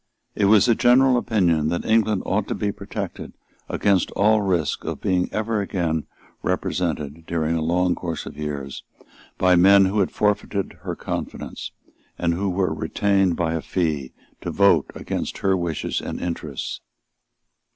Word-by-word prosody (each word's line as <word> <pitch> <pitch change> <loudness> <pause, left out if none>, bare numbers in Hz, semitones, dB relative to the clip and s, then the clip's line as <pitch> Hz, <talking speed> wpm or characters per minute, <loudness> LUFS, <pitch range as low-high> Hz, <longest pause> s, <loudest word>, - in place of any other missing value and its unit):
It 100 - +1
was 105 0 +6
the 120 - +4
general 125 +3 +5
opinion 90 -10 +2
that 85 - -2
England 110 -3 +2
ought - - 0
to - - -2
be 100 - -1
protected - - -6 0.4
against 100 -4 +2
all 105 +2 +3
risk 90 -7 0
of - - -4
being 90 -1 0
ever 110 0 -1
again 85 -5 -2 0.3
represented, 80 -3 -2
during 80 -1 0
a 80 - 0
long 90 +2 +2
course 85 -2 -5
of - - -8
years, 70 -3 -5 0.5
by 90 -1 +4
men 95 +2 +7
who 100 +3 0
had 95 - +2
forfeited 105 -1 -1
her - - -4
confidence, - - -5 0.5
and 85 -1 +1
who 95 +3 -1
were 95 0 0
retained 95 -3 +1
by 80 -1 -1
a 80 - -2
fee 75 -8 -2 0.3
to - - -4
vote 100 -7 +3
against - - -4
her 95 -1 +2
wishes 85 -4 -2
and - - -5
interests. 80 -5 -4
90 Hz, 155 wpm, -23 LUFS, 80-100 Hz, 0.5 s, men